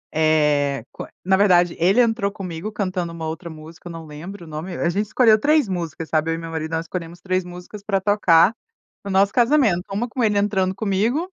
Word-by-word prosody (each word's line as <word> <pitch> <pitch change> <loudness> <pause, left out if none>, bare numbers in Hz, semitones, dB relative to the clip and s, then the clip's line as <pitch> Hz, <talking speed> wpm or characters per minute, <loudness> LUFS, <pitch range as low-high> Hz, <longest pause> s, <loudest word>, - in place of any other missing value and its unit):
Eh, 150 -5 +2
qua - - -9 0.2
na 190 0 +4
verdade 180 -3 +4
ele 190 +8 +3
entrou 225 -4 +2
comigo 185 +1 -6
cantando 185 -4 -3
uma 165 -1 -6
outra 170 +2 -6
música, 160 +2 -11
não 165 -1 -8
lembro 170 +5 -9
o - - -14
nome, 160 +4 -6
a 170 - 0
gente 205 +4 -1
escolheu 220 -2 +4
3 300 -2 +3
músicas, 165 -3 -4
sabe? 160 +1 +1
E - - -3
meu 165 0 -7
marido, 160 0 -4
nós 165 +1 -2
escolhemos 170 -1 -6
3 185 0 -1
músicas 180 +3 -10
para 195 -2 0
tocar 195 -1 +4 0.5
no 200 - -6
nosso 195 +1 +3
casamento, 235 - +3
uma 225 +5 -1
com 245 0 -3
ele 210 -2 +2
entrando 195 -2 +1
comigo 225 - 0
185 Hz, 200 wpm, -21 LUFS, 165-205 Hz, 0.5 s, na